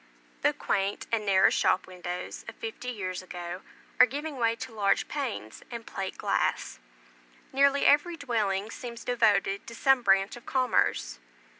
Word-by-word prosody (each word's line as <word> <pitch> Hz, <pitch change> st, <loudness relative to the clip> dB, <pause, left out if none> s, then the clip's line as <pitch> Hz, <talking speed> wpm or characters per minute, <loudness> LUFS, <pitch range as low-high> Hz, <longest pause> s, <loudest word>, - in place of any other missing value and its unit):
The -, -, +4 dB
quaint 195 Hz, +1 st, -1 dB
and 220 Hz, -2 st, 0 dB
narrow 190 Hz, -1 st, +5 dB
shop 185 Hz, 0 st, +2 dB
windows 180 Hz, -1 st, -6 dB
of -, -, -8 dB
fifty 445 Hz, -, -6 dB
years 185 Hz, -6 st, -4 dB
ago, 180 Hz, 0 st, -7 dB, 0.4 s
are 250 Hz, -, +9 dB
giving 290 Hz, +3 st, -5 dB
way 230 Hz, -2 st, +2 dB
to 230 Hz, -, -8 dB
large 200 Hz, -2 st, +1 dB
panes 245 Hz, -, -4 dB
and 235 Hz, -2 st, -7 dB
plate 190 Hz, -1 st, -5 dB
glass. -, -, -1 dB, 0.7 s
Nearly 280 Hz, +1 st, +4 dB
every 330 Hz, +4 st, +4 dB
dwelling 215 Hz, -7 st, -1 dB
seems 235 Hz, -2 st, -7 dB
devoted 205 Hz, -5 st, +2 dB
to 230 Hz, -, -8 dB
some 270 Hz, +1 st, +4 dB
branch 195 Hz, -1 st, +3 dB
of 240 Hz, -, -14 dB
commerce. 255 Hz, -, +1 dB
225 Hz, 150 wpm, -28 LUFS, 195-250 Hz, 0.7 s, are